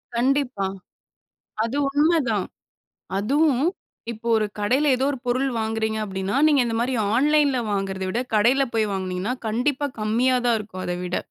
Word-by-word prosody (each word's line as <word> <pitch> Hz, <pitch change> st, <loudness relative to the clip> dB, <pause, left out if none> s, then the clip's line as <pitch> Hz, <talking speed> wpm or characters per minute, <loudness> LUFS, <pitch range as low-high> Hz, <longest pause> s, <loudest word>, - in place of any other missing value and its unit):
கண்டிப்பா. 250 Hz, -4 st, +1 dB, 1.0 s
அது 230 Hz, +4 st, -3 dB
உண்மதான். 295 Hz, 0 st, +2 dB, 0.7 s
அதுவும், 275 Hz, +5 st, +2 dB, 0.5 s
இப்போ 235 Hz, +1 st, -7 dB
ஒரு 215 Hz, -1 st, +1 dB
கடையில 260 Hz, +8 st, +2 dB
எதோ 260 Hz, -, 0 dB
ஒரு 275 Hz, -, -4 dB
பொருள் 255 Hz, +2 st, +1 dB
வாங்குகிறீங்க 220 Hz, 0 st, -1 dB
அப்பிடின்னா, 190 Hz, +1 st, -3 dB
நீங்க 290 Hz, -3 st, +4 dB
இந்தமாரி 235 Hz, +3 st, -1 dB, 0.2 s
ஆன்லைன்ல 285 Hz, 0 st, +3 dB
வாங்குறத 195 Hz, -1 st, -2 dB
விட, 235 Hz, -, -1 dB
கடையில 240 Hz, +6 st, +4 dB
போய் 215 Hz, -2 st, +1 dB
வாங்குனீங்கன்னா, 190 Hz, +4 st, -2 dB
கண்டிப்பா 270 Hz, +6 st, 0 dB
கம்மியாதான் 240 Hz, +2 st, +2 dB
இருக்கும் 195 Hz, -3 st, -7 dB
அத 180 Hz, -, -1 dB
விட. 180 Hz, 0 st, -2 dB
235 Hz, 135 wpm, -23 LUFS, 210-270 Hz, 1.0 s, நீங்க